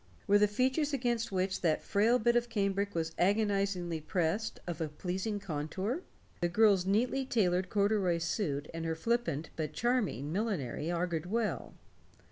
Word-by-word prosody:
Were 205 0 +5
the 210 - +5
features 260 +7 +1
against 240 -4 0
which 185 0 -1
that 160 -3 +1
frail 220 +5 +3
bit 235 +1 +2
of 240 0 +1
cambric 200 -2 0
was 165 -1 -1
agonizingly 195 -4 +1
pressed 175 +7 -1
of 170 -2 -4
a 160 - 0
pleasing 185 +7 -3
contour? 190 - -3 0.4
The 175 - +1
girl's 195 -1 +4
neatly 245 +7 +2
tailored 185 -7 +1
corduroy 200 -4 +2
suit 155 -4 -2
and 165 0 -4
her 165 0 -1
flippant 195 -6 -1
but 155 -2 -3
charming 215 - 0
millinery 170 - -2
augured 170 -1 -1
well. 220 +2 -2
195 Hz, 150 wpm, -32 LUFS, 170-220 Hz, 0.4 s, Were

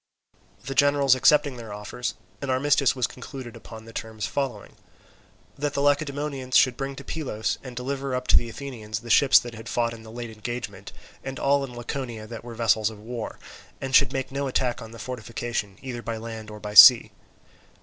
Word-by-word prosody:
The 135 - -3
generals 140 -1 +4
accepting 140 +1 +4
their 115 -3 -8
offers, 105 +4 -5 0.3
an 140 - -4
armistice 140 0 +3
was 125 -2 +1
concluded 125 -2 -8
upon 110 -1 -11
the 115 - -12
terms 110 -2 -5
following: 135 -3 -4 0.8
That 145 0 -2
the - - 0
Lacedaemonians 145 -2 +1
should 130 -2 +4
bring 135 +1 -4
to 140 - -9
Pylos 120 -9 -3
and 130 -2 -9
deliver 135 +1 -3
up 125 0 -3
to - - +6
the 120 - +3
Athenians 115 -5 -6
the 120 -1 -5
ships 140 +3 +7
that 120 -1 -1
had 110 0 -9
fought 115 -1 0
in 115 - -10
the 110 - -12
late 120 0 -6
engagement, 110 -2 -6 0.3
and 135 -1 -5
all 140 0 +2
in 125 -3 -7
Laconia 120 -2 -5
that 115 +1 -8
were 120 -1 -8
vessels 110 -2 +2
of 110 - -11
war, 115 +1 -6 0.4
and 135 -1 -5
should 135 -1 +6
make 135 -1 -3
no 140 +1 -2
attack 125 -2 -1
on 115 - -8
the 115 - -11
fortification 115 -3 -4
either 125 -3 -5
by 115 -1 -4
land 110 -1 -7
or 105 0 -9
by 105 0 -6
sea. 115 +3 +10
120 Hz, 195 wpm, -25 LUFS, 115-135 Hz, 0.8 s, sea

